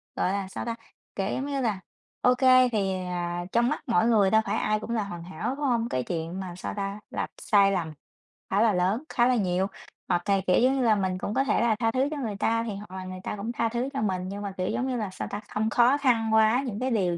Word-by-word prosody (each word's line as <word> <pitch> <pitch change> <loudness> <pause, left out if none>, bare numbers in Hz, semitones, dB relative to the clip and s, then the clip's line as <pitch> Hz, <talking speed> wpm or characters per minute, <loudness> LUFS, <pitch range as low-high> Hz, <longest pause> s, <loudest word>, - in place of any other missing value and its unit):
gọi 185 - +1
là, 200 -1 -2
sao 195 - -6
ta? 230 -1 -2 0.4
Kiểu, 195 -1 -1
giống 265 - -2
như 280 -2 -2
là, 215 -6 0 0.4
ô 250 0 +4
kê 255 -1 +5
thì, 195 -3 0
à, 175 0 -3
trong 235 +1 +3
mắt 300 - -3
mỗi 220 -1 +3
người 210 -5 +4
đâu 220 0 +5
phải - - -1
ai 215 0 +1
cũng 225 - -8
là 220 -3 0
hoàn 175 -4 -7
hảo, 185 +9 -4
đúng 290 0 -3
hông? 235 -2 +1
Cái 125 - -1
chuyện 170 +2 -4
mà 180 -2 -6
sao - - -5
ta? 200 +1 -3
Là - - -3
sai 200 -2 +4
lầm 165 -5 -2 0.6
khá 200 +2 +2
là 225 -3 +4
lớn, 190 - +1
khá 240 0 +3
là 255 - +3
nhiều, 190 -2 +1 0.4
hoặc 175 -1 +2
cày 195 -1 +2
kiểu, 180 - +4
giống 260 +2 +4
như 265 - 0
là, 220 -2 +4
mình 190 -2 -1
cũng 205 - -4
có 270 - +2
thể 270 - +1
là 230 -2 +3
tha 225 -1 +2
thứ 260 +3 +1
cho 300 - -3
người 220 -7 -3
ta 230 +2 +1
thì 215 -4 -4
hoặc 200 -2 -10
là 185 - -5
người 185 0 -7
ta - - -3
cũng 210 +4 -4
tha 230 -1 0
thứ 240 +3 -2
cho 270 - -2
mình, 185 -3 -1
nhưng 200 +1 -5
mà, 200 -2 -4
kiểu, 185 - -1
giống 255 - -1
như 255 - -1
là 210 -4 -2
sao - - -5
ta? 205 - -4
Không 220 +1 -1
khó 245 +4 +4
khăn 230 -6 +2
quá 220 +4 +4
những 215 -4 -4
cái 260 0 -1
điều 180 -6 +1
215 Hz, 280 wpm, -27 LUFS, 190-240 Hz, 0.6 s, kê